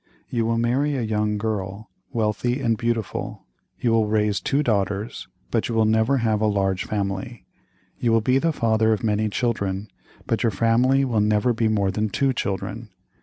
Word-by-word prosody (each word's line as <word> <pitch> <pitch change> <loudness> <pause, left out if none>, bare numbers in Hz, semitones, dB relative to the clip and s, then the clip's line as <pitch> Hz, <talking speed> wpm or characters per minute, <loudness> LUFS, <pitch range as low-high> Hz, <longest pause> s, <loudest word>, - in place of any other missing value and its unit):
You 115 -2 0
will 115 0 +1
marry 130 +5 +1
a 125 - -1
young 105 -1 0
girl, 105 -2 -4 0.2
wealthy 115 +3 0
and 115 -4 +1
beautiful. 115 -2 -3 0.3
You 120 - +1
will 110 -1 +3
raise 105 -1 +1
two 140 +2 +1
daughters, 100 -2 -1 0.2
but - - 0
you 115 - -2
will 110 -1 +4
never 110 +5 +3
have 110 -3 +1
a 110 - +3
large 95 -2 0
family. 100 +2 -3 0.5
You 120 - +1
will 115 - +5
be 125 +4 +2
the 165 +3 +1
father 110 -5 +2
of 110 - -3
many 110 -1 +1
children, 100 -4 -2 0.4
but - - -1
your 115 - +2
family 125 +5 +3
will 115 -5 +1
never 105 +3 +2
be 115 0 +1
more 100 -3 +1
than 105 +2 -1
two 135 +6 +1
children. 110 +1 -4
110 Hz, 180 wpm, -23 LUFS, 105-120 Hz, 0.5 s, will